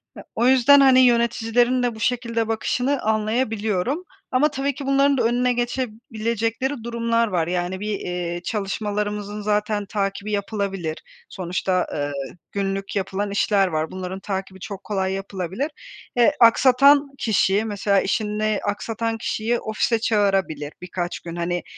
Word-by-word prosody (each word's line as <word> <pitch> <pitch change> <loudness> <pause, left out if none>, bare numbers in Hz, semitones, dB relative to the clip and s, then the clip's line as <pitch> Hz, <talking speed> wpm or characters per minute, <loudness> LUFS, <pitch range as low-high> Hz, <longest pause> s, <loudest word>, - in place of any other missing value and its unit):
Ya, - - -10
o 235 +2 +2
yüzden, 265 +2 +6
hani, 265 -2 +6
yöneticilerin 240 0 +3
de 240 -2 0
bu - - -10
şekilde 230 -2 0
bakışını 250 +5 0
anlayabiliyorum 220 - 0 0.3
ama 285 +4 +3
tabii 280 0 -1
ki 275 - -6
bunların 275 +1 +3
da 245 - +2
önüne 245 +2 +2
geçebilecekleri 235 0 -2
durumlar 230 0 0
var. 175 -5 0
Yani, 180 +1 -2
bir, 210 0 -3
eee, 175 -1 -4
çalışmalarımızın 210 0 -3
zaten 210 0 0
takibi 200 +1 -3
yapılabilir. 195 -5 -3 0.3
Sonuçta, 185 0 -1
eee, 145 -1 -2 0.4
günlük 195 0 -3
yapılan 200 +1 -2
işler 200 -1 +2
var. 155 -2 -2
Bunların 185 0 -5
takibi 190 -1 -5
çok 200 +1 -7
kolay 190 -2 -1
yapılabilir. 195 - -4 0.4
Eee, 240 -1 +5
aksatan 275 +4 +6
kişiyi, 205 -2 +2
mesela 200 -2 +1
işini 215 0 0
aksatan 225 +2 -2
kişiyi, 225 +2 -1
ofise 220 +1 0
çağırabilir 195 - 0
birkaç 180 0 -4
gün, 170 -1 -8
hani, 175 +1 -2
215 Hz, 135 wpm, -23 LUFS, 195-235 Hz, 0.4 s, yüzden